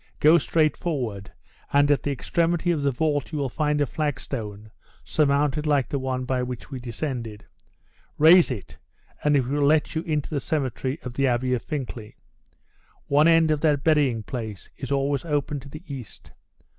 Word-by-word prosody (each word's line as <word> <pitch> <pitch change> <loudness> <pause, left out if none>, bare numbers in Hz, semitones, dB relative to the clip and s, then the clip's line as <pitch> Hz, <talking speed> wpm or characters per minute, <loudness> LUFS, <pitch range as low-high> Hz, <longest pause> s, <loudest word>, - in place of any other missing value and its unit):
Go 160 +3 +6
straight 155 -3 +1
forward, 120 - -3 0.4
and 145 +1 +4
at 145 - +3
the - - -2
extremity 170 +5 0
of 160 -4 0
the 140 - +2
vault 145 +2 -1
you 155 - -3
will 140 -2 -1
find 150 +2 0
a 145 - +3
flag 145 0 -2
stone, 105 -4 -6 0.3
surmounted 150 0 +1
like 145 -3 +2
the 140 - -1
one 130 -1 -2
by 125 0 0
which 125 +2 -6
we 130 - -5
descended; 120 -3 -5 0.7
raise 165 +3 +7
it, 110 -8 -7 0.4
and 150 -1 +3
it 130 - +1
will 145 +4 -1
let 150 +2 +3
you 160 - -1
into 155 -3 -2
the 145 - 0
cemetery 135 -1 -2
of 125 - -6
the 135 +2 +1
Abbey 125 +1 +1
of 125 - 0
Fincklay. 125 -7 -6 0.9
One 145 +3 +5
end 165 -1 +5
of 150 -1 0
that 145 -3 +2
burying 140 -8 +2
place 110 -4 -6
is 135 -1 -7
always 140 0 0
open 145 -2 -1
to 135 +1 -12
the 155 +4 -10
east. 135 - -9
140 Hz, 180 wpm, -25 LUFS, 125-150 Hz, 0.9 s, raise